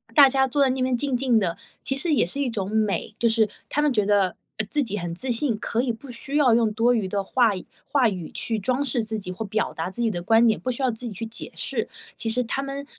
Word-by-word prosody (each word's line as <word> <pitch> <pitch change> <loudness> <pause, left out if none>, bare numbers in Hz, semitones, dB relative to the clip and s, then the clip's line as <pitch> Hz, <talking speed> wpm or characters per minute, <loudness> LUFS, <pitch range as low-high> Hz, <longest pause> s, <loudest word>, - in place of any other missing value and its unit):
大 280 -2 +9
家 265 0 +2
坐 280 +3 +1
在 265 - +4
那 260 0 -1
边 255 -1 +1
静 270 0 -1
静 245 -3 +3
的， 170 -4 -1 0.3
其 270 - -1
实 310 +3 +1
也 240 - +3
是 280 - -3
一 260 - 0
种 195 -4 -3
美。 215 0 -1
就 235 - +2
是 220 -2 +3 0.2
他 295 - 0
们 300 -2 +3
觉 210 -3 +2
得， 200 -3 +2 0.2
呃 220 - -1
自 295 +4 +2
己 210 -4 -3
很 170 -1 -4
自 255 +6 -1
信， 230 -2 0
可 230 +2 -1
以 250 -2 0
不 255 +3 -10
需 270 +4 -7
要 265 -6 +5
用 225 -2 +3
多 235 +3 +3
余 210 -5 0
的 200 +1 -1
话 225 -1 +2
语 185 - -7 0.3
话 260 -6 +4
语 180 -5 -5
去 225 -2 -2
装 255 +6 0
饰 240 -4 -1
自 220 0 -3
己 185 -2 -7
或 220 +4 -5
表 215 +2 -1
达 165 +2 -3
自 240 +6 -3
己 230 - +2
的 175 -3 -4
观 225 +4 +4
点， 220 -2 +3
不 255 - -3
需 245 - -5
要 255 - +3
自 235 +2 -5
己 215 - -6
去 225 - -5
解 225 +1 -9
释。 - - -2 0.3
其 225 - -2
实 250 +2 +2
他 255 +4 -2
们 275 +1 -5
230 Hz, 305 characters per minute, -24 LUFS, 210-260 Hz, 0.3 s, 大